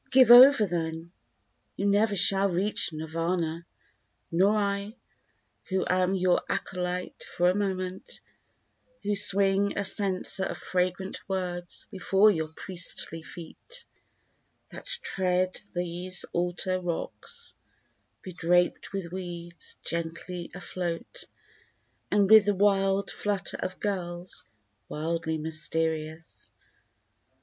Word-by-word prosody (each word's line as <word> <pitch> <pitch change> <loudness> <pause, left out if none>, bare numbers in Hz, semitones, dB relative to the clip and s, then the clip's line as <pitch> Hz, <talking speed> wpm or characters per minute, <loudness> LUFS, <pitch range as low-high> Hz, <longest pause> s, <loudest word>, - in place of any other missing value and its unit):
Give 255 -2 +6
over 250 -1 +9
then, 165 -2 -4 0.6
you 200 - -2
never 205 +1 +3
shall 195 +1 +5
reach 190 +1 0
Nirvana! 165 +1 -3 0.6
Nor 195 +5 +3
I, 200 +1 -2 0.7
who 190 0 -1
am 185 +1 +2
your 185 -1 +2
acolyte 180 -1 -3
for 175 +1 +1
a - - -3
moment; 190 -2 -3 0.8
Who 205 0 0
swing 200 0 +3
a 200 - 0
censer 190 -1 +1
of - - -4
fragrant 185 +1 -2
words 175 -2 -3
before 195 +2 +4
your 160 -4 -2
priestly 170 -1 -3
feet, 320 - -10 0.8
That - - -10
tread 185 -1 0 0.2
these 180 +1 -2
altar 180 +1 -1
rocks, 180 - -5 0.7
bedraped 175 +1 0
with 190 -4 -4
weeds 175 -2 -6
gently 170 +1 -4
afloat, 180 - -5 0.8
And 205 -1 +3
with 215 0 +8
the 205 -1 +2
wild 195 0 +2
flutter 205 -3 -2
of 185 - -5
gulls 180 -3 -4 0.4
wildly 160 +1 -2
mysterious. 160 +1 -3
185 Hz, 105 wpm, -28 LUFS, 170-200 Hz, 0.8 s, over